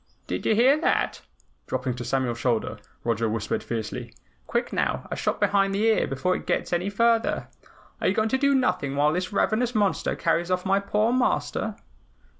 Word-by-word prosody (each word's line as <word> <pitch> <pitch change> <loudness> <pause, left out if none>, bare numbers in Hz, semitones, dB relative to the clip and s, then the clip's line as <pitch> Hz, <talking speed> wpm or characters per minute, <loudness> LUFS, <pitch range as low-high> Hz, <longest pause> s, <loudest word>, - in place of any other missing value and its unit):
"Did - - -3
you 220 - +4
hear 265 +7 +4
that?" - - +1 0.5
Dropping 130 0 -2
to 120 - -4
Samuel's 120 -1 -1
shoulder, 120 -3 -1 0.2
Roger 115 -1 0
whispered 110 -1 -2
fiercely. 110 -2 -5 0.3
"Quick - - -1
now, - - -1
a - - -1
shot - - -1
behind 195 -1 +2
the 205 - 0
ear, 225 -1 +3
before 160 +8 0
it - - -7
gets - - -1
any 175 +3 0
further. 230 +2 +1 0.5
Are - - +2
you 190 - +2
going 220 0 +1
to 265 - +2
do 280 0 +3
nothing 180 - 0
while 150 +2 +3
this 180 +3 -2
ravenous 230 +4 +1
monster 205 -3 +1
carries 170 +1 0
off 180 0 0
my 195 +1 +3
poor 210 +3 +1
Master?" 255 0 0
190 Hz, 185 wpm, -25 LUFS, 130-220 Hz, 0.5 s, you